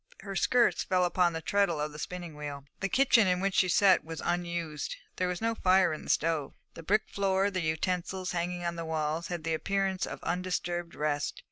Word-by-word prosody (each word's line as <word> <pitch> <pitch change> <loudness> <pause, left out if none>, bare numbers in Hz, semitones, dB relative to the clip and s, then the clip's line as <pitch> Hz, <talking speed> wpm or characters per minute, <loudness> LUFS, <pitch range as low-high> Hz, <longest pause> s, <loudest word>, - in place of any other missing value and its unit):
Her 195 -1 -6
skirts 245 +4 +3
fell 185 -1 +2
upon 175 0 +2
the 160 0 -5
treadle 200 -3 +1
of 150 0 -2
the 150 - -10
spinning 175 -3 -6
wheel. 145 -2 -6
The 195 - -1
kitchen 250 -2 +4
in 180 -1 +2
which 195 +1 0
she 185 - +3
sat 190 +2 +5
was 165 0 -7
unused; 170 - -2 0.2
there 185 - +1
was 180 -1 -3
no 230 0 +2
fire 185 -5 +3
in 155 - -7
the - - -9
stove. 160 -3 +1 0.2
The - - -9
brick 210 +6 +2
floor, 195 0 +1
the 185 -2 -1
utensils 180 +3 -1
hanging 175 0 -2
on 170 0 -2
the 165 - -3
walls, 160 +1 -2
had 175 -2 -4
the 165 - -1
appearance 195 +2 0
of - - -6
undisturbed 175 -1 -2
rest. 145 -1 -1
175 Hz, 210 wpm, -30 LUFS, 160-190 Hz, 0.2 s, sat